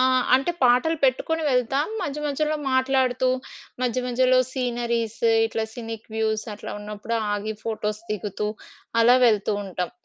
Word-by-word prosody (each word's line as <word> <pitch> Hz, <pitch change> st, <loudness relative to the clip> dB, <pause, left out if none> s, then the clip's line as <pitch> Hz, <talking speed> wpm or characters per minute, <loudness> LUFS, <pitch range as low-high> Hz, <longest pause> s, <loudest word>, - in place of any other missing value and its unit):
ఆ! -, -, +5 dB, 0.3 s
అంటే 270 Hz, +6 st, +2 dB
పాటలు 255 Hz, +6 st, +4 dB
పెట్టుకొని 320 Hz, +5 st, +1 dB
వెళ్తాం. 270 Hz, +3 st, +1 dB, 0.2 s
మధ్య 300 Hz, -3 st, -3 dB
మధ్యలో 300 Hz, +2 st, 0 dB
మాట్లాడుతూ 260 Hz, -1 st, +2 dB, 0.5 s
మధ్య 250 Hz, 0 st, 0 dB
మధ్యలో 255 Hz, +1 st, +3 dB
సీనరీస్ 235 Hz, -3 st, -2 dB, 0.3 s
ఇట్లా 225 Hz, 0 st, -2 dB
సినిక్ 225 Hz, -2 st, -7 dB
వ్యూస్ 220 Hz, -1 st, 0 dB
అట్లా 205 Hz, -, -7 dB
ఉన్నప్పుడు 210 Hz, +2 st, -4 dB, 0.2 s
ఆగి 210 Hz, +1 st, -2 dB
ఫోటోస్ 215 Hz, -1 st, -2 dB
దిగుతూ 210 Hz, 0 st, -3 dB, 0.5 s
అలా 240 Hz, +2 st, +6 dB
వెళ్తూ 215 Hz, -2 st, +2 dB
ఉంటాం. 180 Hz, -2 st, -3 dB
240 Hz, 130 wpm, -24 LUFS, 220-260 Hz, 0.5 s, అలా